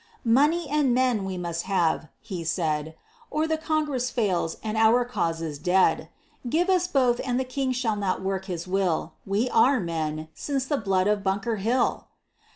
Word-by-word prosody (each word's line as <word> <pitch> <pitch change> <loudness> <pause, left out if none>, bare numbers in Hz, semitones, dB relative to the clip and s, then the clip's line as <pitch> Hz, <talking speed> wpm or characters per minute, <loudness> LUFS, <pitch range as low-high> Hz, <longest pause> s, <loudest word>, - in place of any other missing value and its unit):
"Money 295 +8 +3
and 280 -4 +2
men 250 -5 +2
we 190 -1 -4
must 170 -1 -3
have," 165 -4 +1
he 180 -4 -6
said, 160 -2 -1 0.3
"Or 310 +1 0
the 320 0 0
Congress 305 -5 -1
fails 190 -9 -1
and 215 0 -3
our 225 +3 +4
cause 170 -9 -2
is 150 -3 -5
dead; 180 +4 +2 0.4
Give 350 +7 +2
us 360 -1 +2
both 255 -7 +2
and 250 -1 0
the - - +1
King 260 +1 -2
shall 240 -4 -1
not 190 -2 -1
work 190 0 -2
his 175 -3 -5
will. 185 -3 0
We 205 +5 +1
are 260 +3 +4
men, 155 -3 -3
since 270 - -2
the 290 +1 0
blood 195 -5 +1
of 210 0 +1
Bunker 200 +3 -1
Hill!" 230 +6 0
215 Hz, 175 wpm, -26 LUFS, 180-260 Hz, 0.4 s, our